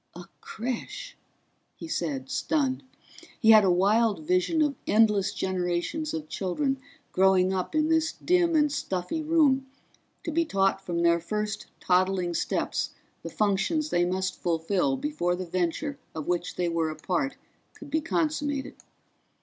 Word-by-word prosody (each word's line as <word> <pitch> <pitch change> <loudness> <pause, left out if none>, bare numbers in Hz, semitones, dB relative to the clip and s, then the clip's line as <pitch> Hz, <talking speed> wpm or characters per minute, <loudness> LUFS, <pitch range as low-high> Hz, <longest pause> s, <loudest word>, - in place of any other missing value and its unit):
"A 175 - -8 0.2
creche," 255 - -5 0.6
he - - -8
said, 145 - -3
stunned. 275 -4 0 0.6
He 225 -2 +6
had 215 -1 +8
a 190 - +3
wild 200 0 +2
vision 185 - +2
of 295 -2 +1
endless 210 -3 +3
generations 185 - -2
of 155 -1 -4
children 265 - -1 0.3
growing 190 0 +4
up 185 +9 -3
in 310 0 +3
this 320 0 +2
dim 350 -2 +2
and 300 -1 +3
stuffy 190 - -2
room, 300 -4 +3 0.6
to 335 - -3
be 335 +2 +2
taught 195 -8 +1
from 170 -2 -2
their 170 0 +4
first 210 +4 -3
toddling 185 -1 +1
steps - - -1 0.3
the - - -6
functions 215 +10 0
they 175 - +3
must 185 +1 -2
fulfill 190 - 0
before 260 - -1
the 185 +1 -5
venture 180 - -2 0.2
of 155 -2 -4
which 175 0 -1
they 180 - 0
were 165 -1 0
a 155 - -5
part 275 - -1 0.4
could 285 - -12
be 315 - +1
consummated. 295 -4 -1
205 Hz, 150 wpm, -27 LUFS, 180-295 Hz, 0.6 s, had